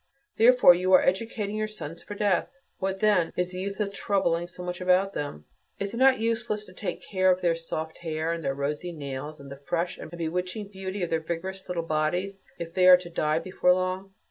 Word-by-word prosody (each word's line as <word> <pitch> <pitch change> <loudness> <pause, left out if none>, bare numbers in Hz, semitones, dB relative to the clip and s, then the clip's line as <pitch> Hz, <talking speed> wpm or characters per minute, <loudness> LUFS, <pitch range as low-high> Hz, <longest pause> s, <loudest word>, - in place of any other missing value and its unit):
Therefore 245 -5 +8
you 185 +2 0
are 185 - +7
educating 210 +2 -1
your 215 0 -1
sons 170 -6 -8
for 205 - -8
death. 205 -3 +1 0.3
What, 190 0 -2
then, 205 -6 +3
is 180 0 0
the 180 - -6
use 200 +2 -4
of 200 -1 -1
troubling 175 -5 0
so 180 +1 -10
much 180 0 -5
about 185 +2 +3
them? 75 - -5 0.3
Is 200 0 -4
it - - -4
not 265 +1 +5
useless 225 -1 -1
to 185 - -14
take 185 -1 -5
care 185 -1 +2
of 185 0 +3
their 170 -2 +3
soft 160 -1 -5
hair, 160 -1 -2
and 165 -1 -5
their 135 - -1
rosy 150 +5 -3
nails, 145 0 -6
and 140 -1 -11
the 140 - -7
fresh 175 +1 -1
and - - -8
bewitching 180 +5 -3
beauty 190 -1 -5
of 175 - -3
their 165 - +2
vigorous 175 +4 -5
little 175 -2 -2
bodies, 175 +5 -1 0.2
if 165 0 -6
they 185 0 +4
are 180 0 +10
to 175 -1 -10
die 155 -1 +1
before 180 +1 +2
long? 185 +1 -3
180 Hz, 220 wpm, -27 LUFS, 165-195 Hz, 0.3 s, are